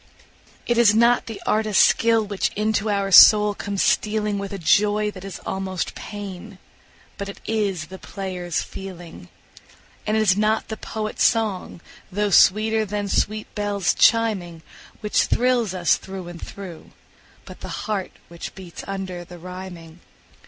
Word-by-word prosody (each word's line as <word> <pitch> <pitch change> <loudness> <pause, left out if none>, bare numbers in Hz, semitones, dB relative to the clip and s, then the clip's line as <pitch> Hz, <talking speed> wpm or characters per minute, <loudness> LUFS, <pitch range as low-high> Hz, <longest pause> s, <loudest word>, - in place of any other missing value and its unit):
It 240 -1 +1
is 215 -3 +5
not 235 +2 +3
the 225 -2 -7
artist's 215 -2 +3
skill 225 -1 +2
which 200 -1 -1
into 215 0 0
our 200 -1 0
soul 210 +2 +8
comes 200 -1 -2
stealing 210 -1 +1
With 200 -1 -5
a 200 - -4
joy 210 +4 +2
that 185 -2 -11
is 195 -2 -7
almost 190 -2 -3
pain, 205 -1 -8 0.6
but 200 0 -4
it 200 - -9
is 200 -7 -1
the 190 +4 -11
player's 180 -3 -4
feeling. 175 -3 -10 0.8
And 215 +1 +1
it - - +3
is 195 -3 +4
not 215 +2 0
the 220 - -5
poet's 215 0 -3
song, 215 -7 0 0.3
though 205 +2 -1
sweeter 220 +4 +4
than 205 0 -3
sweet 215 +2 -1
bells 205 -3 0
chiming, 195 -8 +2 0.4
Which 210 - +2
thrills 240 -6 +1
us 175 -2 +2
through 190 -2 -8
and 175 -1 -10
through, 185 -5 -10 0.5
but - - -12
the - - -6
heart 205 -4 -3
which 170 0 -9
beats 185 -3 -10
under 190 -3 -5
the 175 0 -12
rhyming. 175 -2 -10
200 Hz, 150 wpm, -22 LUFS, 185-215 Hz, 0.8 s, soul